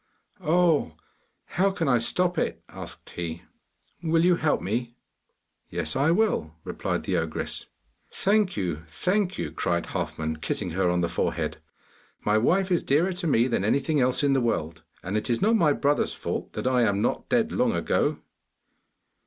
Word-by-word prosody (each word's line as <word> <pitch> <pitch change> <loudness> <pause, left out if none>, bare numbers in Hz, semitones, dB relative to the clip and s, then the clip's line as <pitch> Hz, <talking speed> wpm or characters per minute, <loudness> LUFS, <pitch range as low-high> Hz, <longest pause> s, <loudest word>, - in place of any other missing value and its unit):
'Oh, 160 - +2 0.5
how 195 +3 +1
can 180 -5 -2
I 125 -3 +4
stop 180 +9 +1
it?' - - -2
asked - - -10
he. 85 -1 -5 0.6
'Will 165 0 +2
you 180 -1 +5
help 155 -2 +1
me?' 120 +5 -3 0.7
'Yes, 85 -3 -3
I 140 +4 +3
will,' 170 - +1
replied - - -3
the - - 0
ogress. - - -2 0.4
'Thank 200 -1 +1
you, 90 -6 -1
thank 185 - 0
you!' - - -3
cried 85 -1 -1
Halfman, 80 0 -3
kissing 90 +4 -3
her 90 +1 +1
on 90 0 +1
the 85 - +1
forehead. 85 - -2 0.7
'My 105 +1 +3
wife 185 - +2
is 175 - +3
dearer 165 +7 +2
to 175 -1 -3
me 120 -4 +3
than 115 -6 0
anything 140 +6 +1
else 125 +3 +2
in 140 -1 +3
the 135 - +2
world, 85 -8 -1 0.2
and 95 +3 -3
it 110 - -1
is 115 - +1
not 220 +3 +3
my 165 -9 +4
brother's 145 +1 +1
fault - - -4
that - - -4
I 130 -1 +3
am 100 -2 +2
not - - -1
dead 235 -1 +2
long 245 -1 +1
ago. - - +1
135 Hz, 170 wpm, -26 LUFS, -, 0.7 s, you